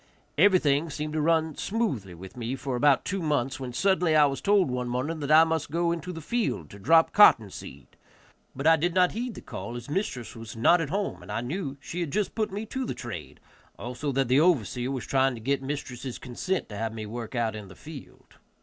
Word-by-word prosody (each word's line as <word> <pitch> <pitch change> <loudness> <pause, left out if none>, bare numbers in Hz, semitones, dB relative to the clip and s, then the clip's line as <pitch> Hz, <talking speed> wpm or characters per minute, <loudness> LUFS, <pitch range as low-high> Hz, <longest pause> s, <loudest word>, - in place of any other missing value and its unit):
Everything 165 -4 +4
seemed 150 +1 -4
to 155 - 0
run 160 0 +2
smoothly 135 - -2
with 95 +2 -11
me 120 +1 -3
for 135 -1 -4
about 135 +2 +3
two 195 0 -2
months, 140 -5 -1
when 130 -2 -5
suddenly 180 +2 +2
I 150 -1 +7
was 135 -1 -2
told 200 -8 +3
one 125 0 -2
morning 140 +7 -2
that 145 -1 -4
I 155 +1 +8
must 160 -2 -1
go 170 +2 0
into 170 +2 -4
the 165 -2 -7
field 205 - -2
to 100 - -11
drop 160 +10 +4
cotton 115 - +6
seed, - - -10 0.7
but 135 +3 -5
I 165 0 +6
did 170 +3 -1
not 180 -1 +4
heed 240 +1 -4
the - - -9
call, 100 +6 -7
as 120 +4 -8
mistress 145 - -3
was 115 0 -9
not 165 +10 +4
at 155 - -3
home, 200 +4 -2
and - - -10
I 110 +2 -1
knew 140 +2 -4
she 170 +5 -6
had 170 -4 -2
just 205 +3 -1
put 215 -2 -1
me 205 +3 -4
to 265 +4 -4
the - - -4
trade, 85 - -8 0.4
also 125 +4 -4
that 135 0 +1
the 130 +3 +4
overseer 130 - +2
was 135 -3 -3
trying 135 -1 +2
to - - -8
get 135 +4 0
mistress' 135 -2 -5
consent 155 +10 -3
to 105 - -7
have 110 +1 -3
me 110 -1 -5
work 115 +2 -6
out 115 -2 0
in 105 -2 -8
the 95 - -13
field. 150 -3 -12
140 Hz, 230 wpm, -27 LUFS, 120-170 Hz, 0.7 s, I